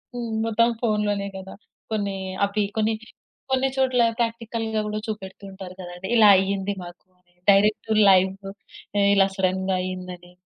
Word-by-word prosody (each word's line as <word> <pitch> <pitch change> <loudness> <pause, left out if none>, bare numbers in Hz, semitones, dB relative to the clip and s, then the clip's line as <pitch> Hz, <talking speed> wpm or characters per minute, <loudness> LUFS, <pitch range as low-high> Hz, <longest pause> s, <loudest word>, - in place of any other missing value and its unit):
హ్మ్, 235 -1 -4 0.2
మొత్తం 230 +1 +3
ఫోన్‌లోనే 210 -3 0
కదా! 190 0 -9 0.4
కొన్ని 200 -2 -1 0.3
అవి 200 +1 0 0.2
కొన్ని, 220 +1 +2 0.6
కొన్ని 265 0 +2
చోట్ల 260 -2 +2 0.2
ప్రాక్టికల్‌గా 230 -1 -2
కూడా 210 0 -3
చూపెడుతూ 200 -2 -7
ఉంటారు 190 -1 -9
కదండి. 175 +1 -8
ఇలా 215 -2 +7
అయింది 195 +1 -1
మాకు 175 0 -12 0.5
డైరెక్ట్ 210 +2 +3 0.2
లైవ్ 190 0 +5 0.8
ఇలా 195 -1 +4
సడెన్‌గా 190 0 0
అయింది 185 0 -5
అని. 175 0 -18
200 Hz, 130 wpm, -24 LUFS, 190-220 Hz, 0.8 s, ఇలా